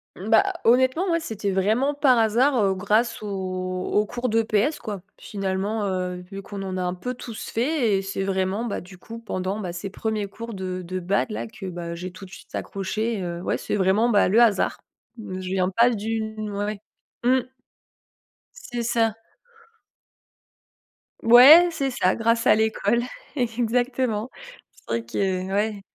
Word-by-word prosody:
Bah, 220 Hz, +4 st, +2 dB
honnêtement, 260 Hz, +10 st, +3 dB
moi, 335 Hz, -, +2 dB
c'était 215 Hz, -, -3 dB
vraiment 220 Hz, +9 st, +1 dB
par 275 Hz, -4 st, +4 dB
hasard, 235 Hz, +6 st, +3 dB
heu, 195 Hz, -1 st, +2 dB
grâce 215 Hz, +6 st, +1 dB
aux 210 Hz, -, -6 dB, 0.6 s
aux 210 Hz, -, +3 dB
cours 245 Hz, +3 st, -3 dB
d'EPS, 225 Hz, +5 st, +1 dB
quoi. 205 Hz, -4 st, -6 dB, 0.2 s
Finalement, 195 Hz, +2 st, -2 dB
heu, 180 Hz, -1 st, -3 dB
vu 195 Hz, -, -6 dB
qu'on 200 Hz, 0 st, -7 dB
en 185 Hz, -1 st, -4 dB
a 185 Hz, -, -1 dB
un 180 Hz, 0 st, -1 dB
peu 245 Hz, +8 st, -5 dB
tous 235 Hz, -2 st, -8 dB
fait 240 Hz, -4 st, +1 dB
et 195 Hz, -, -1 dB
c'est 195 Hz, 0 st, -3 dB
vraiment, 190 Hz, +3 st, -1 dB
bah, 230 Hz, -, -3 dB
du 185 Hz, +1 st, -13 dB
coup, 230 Hz, +5 st, -10 dB
pendant, 195 Hz, -2 st, -3 dB
bah, 180 Hz, -4 st, -4 dB
ces 180 Hz, +3 st, -5 dB
1ers 215 Hz, 0 st, -3 dB
cours 230 Hz, +3 st, -8 dB
de 185 Hz, -1 st, -4 dB
de 185 Hz, +1 st, -4 dB
bad, 195 Hz, +5 st, 0 dB
là, -, -, -4 dB
que, 215 Hz, -3 st, -10 dB
bah, 170 Hz, -2 st, -5 dB
j'ai 180 Hz, +2 st, -6 dB
tout 195 Hz, -, -12 dB
de 185 Hz, -, -11 dB
suite -, -, -11 dB
accroché, 210 Hz, +2 st, -3 dB
heu, 170 Hz, 0 st, -4 dB
ouais, -, -, -1 dB
c'est -, -, -3 dB
vraiment, 200 Hz, +4 st, +3 dB
bah, 205 Hz, -5 st, +3 dB
le 220 Hz, -, +4 dB
hasard. 220 Hz, -5 st, +3 dB, 0.4 s
Je 185 Hz, -4 st, -6 dB
viens 185 Hz, -1 st, +1 dB
pas 230 Hz, +6 st, +4 dB
d'une 220 Hz, -1 st, -3 dB
ouais. 205 Hz, 0 st, -3 dB, 0.5 s
Mmh. 255 Hz, 0 st, +3 dB, 1.2 s
C'est 240 Hz, -1 st, -2 dB
ça. 225 Hz, -2 st, +1 dB, 2.1 s
Ouais, 275 Hz, +10 st, +9 dB
c'est 275 Hz, -4 st, -2 dB
ça, 185 Hz, -6 st, +1 dB
grâce 230 Hz, 0 st, +1 dB
à -, -, +6 dB
l'école. 220 Hz, +2 st, +1 dB, 0.3 s
Exactement. 245 Hz, -1 st, 0 dB, 0.4 s
C'est -, -, -24 dB
vrai 115 Hz, 0 st, -2 dB
que 185 Hz, +7 st, -2 dB
ouais. 205 Hz, 0 st, 0 dB
215 Hz, 165 wpm, -24 LUFS, 190-235 Hz, 2.1 s, Ouais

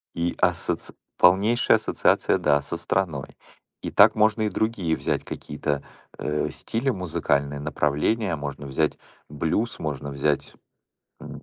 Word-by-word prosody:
И 85 Hz, +1 st, 0 dB
ассоци -, -, 0 dB, 0.2 s
полнейшая 100 Hz, +7 st, +5 dB
ассоциация, -, -, +2 dB
да, 70 Hz, -1 st, +2 dB
со 85 Hz, -, -5 dB
страной. 85 Hz, -4 st, -2 dB, 0.4 s
И -, -, -4 dB
так 105 Hz, +2 st, +6 dB
можно 110 Hz, 0 st, +3 dB
и 105 Hz, -, +1 dB
другие 95 Hz, -6 st, 0 dB
взять -, -, -1 dB
какие-то, 75 Hz, -1 st, -3 dB, 0.3 s
э, 75 Hz, 0 st, -1 dB
стили, 120 Hz, +4 st, -2 dB
музыкальные 70 Hz, -, -1 dB
направления, 75 Hz, +7 st, 0 dB
можно 70 Hz, 0 st, -6 dB
взять 70 Hz, +3 st, 0 dB, 0.3 s
блюз, 80 Hz, +10 st, -1 dB
можно 70 Hz, -2 st, -4 dB
взять, 70 Hz, +1 st, -1 dB, 0.7 s
м, -, -, -9 dB
80 Hz, 125 wpm, -25 LUFS, 75-105 Hz, 0.7 s, так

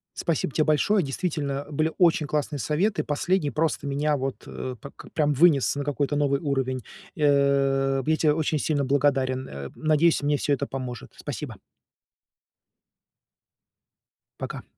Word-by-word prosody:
Спасибо 160 Hz, -4 st, -1 dB
те 155 Hz, -, +2 dB
большое. 170 Hz, +7 st, +3 dB
Действительно, 145 Hz, -2 st, -3 dB
были 155 Hz, +2 st, 0 dB
очень 165 Hz, -4 st, +4 dB
классные 145 Hz, 0 st, -2 dB
советы, 185 Hz, +9 st, 0 dB
последний 150 Hz, +2 st, 0 dB
просто 155 Hz, -1 st, -1 dB
меня 145 Hz, +2 st, 0 dB
вот, 135 Hz, -1 st, -4 dB
э, 130 Hz, -1 st, -6 dB
так 140 Hz, -, -11 dB
прям 150 Hz, -2 st, +2 dB
вынес 145 Hz, -2 st, +4 dB
на 145 Hz, -, -3 dB
какой-то 145 Hz, 0 st, -1 dB
новый 140 Hz, -1 st, +2 dB
уровень. 135 Hz, -3 st, -1 dB, 0.3 s
Э, 140 Hz, -2 st, +2 dB
я 155 Hz, +3 st, +2 dB
те 155 Hz, -1 st, +3 dB
очень 155 Hz, 0 st, 0 dB
сильно 145 Hz, -1 st, 0 dB
благодарен. 135 Hz, -1 st, +1 dB
Э, 70 Hz, -1 st, -7 dB
надеюсь, 155 Hz, +1 st, +2 dB
мне 145 Hz, 0 st, +2 dB
всё 145 Hz, -, 0 dB
это 140 Hz, -, 0 dB
поможет. 130 Hz, -2 st, -6 dB
Спасибо. -, -, -6 dB, 2.8 s
Пока. -, -, -6 dB
145 Hz, 140 wpm, -25 LUFS, 135-155 Hz, 2.8 s, очень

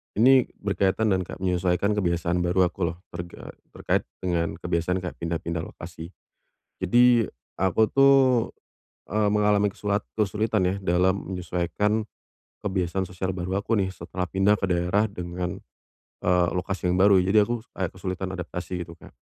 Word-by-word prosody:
ini 130 Hz, +3 st, +5 dB, 0.2 s
berkaitan 100 Hz, +2 st, +1 dB
dan 95 Hz, -, +2 dB
kak -, -, -8 dB
menyesuaikan 90 Hz, +2 st, +1 dB
kebiasaan 90 Hz, -3 st, 0 dB
baru 90 Hz, +1 st, +2 dB
aku 90 Hz, -3 st, -1 dB
loh, 85 Hz, +2 st, -7 dB
terga 85 Hz, 0 st, -8 dB, 0.2 s
terkait -, -, -1 dB, 0.2 s
dengan 85 Hz, -2 st, 0 dB
kebiasaan 90 Hz, +1 st, -1 dB
kayak 90 Hz, -, -6 dB
pindah-pindah 85 Hz, 0 st, -3 dB
lokasi. 85 Hz, 0 st, -8 dB, 0.8 s
Jadi 120 Hz, +3 st, +5 dB, 0.3 s
aku 95 Hz, +4 st, +2 dB
tuh, 135 Hz, +2 st, +5 dB, 1.0 s
eee, 105 Hz, 0 st, +2 dB
mengalami 105 Hz, 0 st, +3 dB
kesulat 100 Hz, +1 st, -2 dB
kesulitan 105 Hz, 0 st, +1 dB
ya, 90 Hz, +1 st, +1 dB
dalam 95 Hz, +1 st, +1 dB
menyesuaikan, 90 Hz, +5 st, -1 dB, 0.6 s
kebiasaan 95 Hz, -1 st, -1 dB
sosial 95 Hz, +1 st, -4 dB
baru 95 Hz, +2 st, -2 dB
aku 110 Hz, +2 st, 0 dB
nih, 95 Hz, -2 st, 0 dB
setelah 90 Hz, 0 st, -5 dB
pindah 95 Hz, +3 st, +2 dB
ke 100 Hz, -, -4 dB
daerah 90 Hz, +3 st, +2 dB
dengan, 90 Hz, -1 st, -4 dB, 0.6 s
eee, 90 Hz, -1 st, +3 dB
lokasi 90 Hz, 0 st, -2 dB
yang 90 Hz, -, +2 dB
baru, 95 Hz, +1 st, +6 dB
jadi, 95 Hz, +4 st, +4 dB
aku 120 Hz, +3 st, -1 dB, 0.2 s
kayak 95 Hz, -3 st, -2 dB
kesulitan 95 Hz, 0 st, -4 dB
adaptasi 90 Hz, 0 st, -5 dB
gitu, 85 Hz, -, -11 dB
Kak. 85 Hz, -, -15 dB
95 Hz, 145 wpm, -25 LUFS, 90-105 Hz, 1.0 s, baru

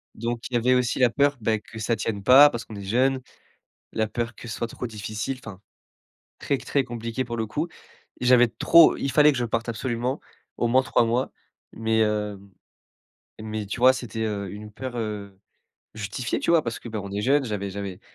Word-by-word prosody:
donc 115 Hz, +1 st, -3 dB
il -, -, -14 dB
y -, -, +4 dB
avait 125 Hz, +2 st, +3 dB
aussi 125 Hz, 0 st, +1 dB
la 125 Hz, -2 st, +5 dB
peur, 140 Hz, +2 st, +2 dB
beh, 110 Hz, 0 st, +1 dB
que 110 Hz, -, -11 dB
ça 115 Hz, +2 st, 0 dB
tienne 100 Hz, -2 st, -3 dB
pas, 135 Hz, +5 st, +8 dB
parce 120 Hz, -4 st, -6 dB
qu'on 110 Hz, -, -10 dB
est 100 Hz, -, -7 dB
jeunes. 130 Hz, +6 st, +1 dB, 0.7 s
La 110 Hz, -, 0 dB
peur 120 Hz, +1 st, -3 dB
que 120 Hz, -, -11 dB
ce 115 Hz, -, -5 dB
soit -, -, -2 dB
trop 125 Hz, -, -6 dB
difficile. 110 Hz, +4 st, -5 dB
Enfin 100 Hz, -3 st, -9 dB, 0.8 s
très, 140 Hz, -, 0 dB
très 140 Hz, 0 st, 0 dB
compliqué 115 Hz, +1 st, -4 dB
pour 120 Hz, -1 st, -5 dB
le 110 Hz, -, -2 dB
coup. 150 Hz, +11 st, -3 dB, 0.5 s
J'avais 125 Hz, -1 st, +5 dB
trop 165 Hz, +7 st, +6 dB
il 135 Hz, -, -2 dB
fallait 150 Hz, 0 st, +6 dB
que 135 Hz, -, -3 dB
je 120 Hz, -, 0 dB
parte 115 Hz, 0 st, -2 dB
absolument, 120 Hz, +3 st, -2 dB, 0.4 s
au 120 Hz, -, 0 dB
moins 130 Hz, +2 st, +4 dB
3 125 Hz, -, +2 dB
mois. 120 Hz, +3 st, 0 dB, 0.4 s
Mais, 110 Hz, 0 st, 0 dB
heu, 105 Hz, -1 st, -1 dB, 1.0 s
mais 110 Hz, -1 st, -4 dB
tu 110 Hz, -, -5 dB
vois, 130 Hz, +2 st, +7 dB
c'était, 120 Hz, -3 st, -5 dB
heu, 100 Hz, -2 st, -3 dB
une 105 Hz, +1 st, -9 dB
peur, 125 Hz, +3 st, -6 dB
heu, 105 Hz, -3 st, -5 dB, 0.6 s
justifiée 110 Hz, +3 st, -3 dB
tu -, -, 0 dB
vois, 170 Hz, -2 st, +5 dB
parce 115 Hz, -3 st, -4 dB
que 120 Hz, -, -10 dB
ben 110 Hz, -3 st, -4 dB
est 100 Hz, +1 st, -2 dB
jeunes, 140 Hz, +4 st, +3 dB
j'avais 100 Hz, -4 st, -3 dB
j'avais 100 Hz, -1 st, -6 dB
115 Hz, 205 wpm, -25 LUFS, 105-125 Hz, 1.0 s, pas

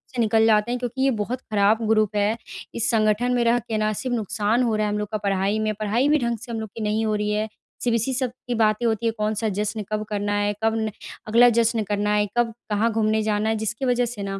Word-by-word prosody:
से -, -, -3 dB
निकल 220 Hz, 0 st, +3 dB
जाते 220 Hz, +1 st, +3 dB
हैं 250 Hz, -, -1 dB
क्योंकि 245 Hz, +1 st, -4 dB
ये 270 Hz, 0 st, +3 dB
बहुत 230 Hz, +2 st, -2 dB
ख़राब 210 Hz, -1 st, +2 dB
ग्रुप 215 Hz, -1 st, +2 dB
है। 210 Hz, +3 st, +1 dB, 0.4 s
इस 230 Hz, -, 0 dB
संगठन 220 Hz, +2 st, +2 dB
में 245 Hz, -1 st, +2 dB
रह 235 Hz, +1 st, +3 dB
के 225 Hz, -1 st, -4 dB
ना 215 Hz, 0 st, +1 dB
सिर्फ़ 245 Hz, +3 st, -2 dB
नुकसान 215 Hz, +2 st, 0 dB
हो 230 Hz, -3 st, +1 dB
रहा 215 Hz, 0 st, +1 dB
है 210 Hz, -, -1 dB
हम -, -, -1 dB
लोग 210 Hz, -, -3 dB
का 215 Hz, -, 0 dB
पढ़ाई 200 Hz, 0 st, 0 dB
में, 215 Hz, 0 st, 0 dB
पढ़ाई 225 Hz, +7 st, +1 dB
भी 305 Hz, -, +5 dB
ढंग 235 Hz, -2 st, -1 dB
से 235 Hz, +2 st, -10 dB
हम 225 Hz, -, -3 dB
लोग 220 Hz, -, -5 dB
की 225 Hz, -, -6 dB
नहीं 215 Hz, +1 st, 0 dB
हो 215 Hz, -1 st, 0 dB
रही 210 Hz, 0 st, -1 dB
है। 215 Hz, +1 st, 0 dB, 0.4 s
सिर्फ़ 240 Hz, -2 st, +2 dB
इसी 230 Hz, +4 st, 0 dB
सब 255 Hz, 0 st, 0 dB, 0.2 s
की 245 Hz, -, -1 dB
बातें 220 Hz, +1 st, +2 dB
होती 225 Hz, -1 st, 0 dB
हैं 225 Hz, -, +1 dB
कौन-सा 215 Hz, +1 st, -1 dB
जश्न 210 Hz, +1 st, -2 dB
कब 215 Hz, 0 st, -1 dB
करना 205 Hz, 0 st, -1 dB
है, 205 Hz, 0 st, +1 dB
कब 225 Hz, 0 st, +2 dB
न 220 Hz, -1 st, -1 dB, 0.4 s
अगला 235 Hz, +3 st, +6 dB
जश्न 230 Hz, -1 st, +2 dB
करना 205 Hz, 0 st, -1 dB
है, 210 Hz, 0 st, +2 dB
कब 235 Hz, -1 st, +2 dB, 0.2 s
कहाँ 215 Hz, +2 st, +1 dB
घूमने 220 Hz, 0 st, +1 dB
जाना 210 Hz, 0 st, 0 dB
है 220 Hz, -, +1 dB
जिसकी 220 Hz, +4 st, -3 dB
वजह 245 Hz, -1 st, +2 dB
से 225 Hz, -4 st, -6 dB
ना 195 Hz, 0 st, -4 dB
220 Hz, 265 wpm, -23 LUFS, 210-235 Hz, 0.4 s, अगला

